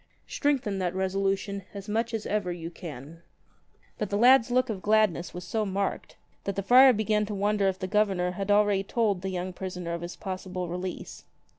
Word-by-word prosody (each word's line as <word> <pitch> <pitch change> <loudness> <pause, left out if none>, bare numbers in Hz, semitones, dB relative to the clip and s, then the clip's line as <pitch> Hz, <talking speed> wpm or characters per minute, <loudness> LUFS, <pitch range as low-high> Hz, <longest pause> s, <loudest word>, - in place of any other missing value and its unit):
Strengthen 260 -9 0
that 180 -1 -1
resolution 195 +1 -1
as 200 -1 -7
much 225 +2 -1
as 225 -2 -3
ever 205 -3 -1
you 170 -1 -6
can." 160 -2 -9 0.8
But 210 - -2
the 205 - 0
lad's 250 +1 +6
look 255 +1 +2
of 210 -5 -4
gladness 210 -5 +2
was 180 - -7
so 215 +5 -1
marked 195 -1 -3 0.3
that 200 - -2
the 200 - -2
friar 255 +5 +8
began 215 -2 +1
to 210 - -4
wonder 205 0 +1
if 190 -1 0
the 185 - -4
Governor 190 -3 +1
had 195 +2 -5
already 205 -1 +4
told 205 -3 0
the 190 - -3
young 185 0 -4
prisoner 180 -2 -5
of 170 - -4
his 175 +1 -6
possible 185 -1 -5
release. 180 +1 -6
195 Hz, 190 wpm, -27 LUFS, 180-210 Hz, 0.8 s, friar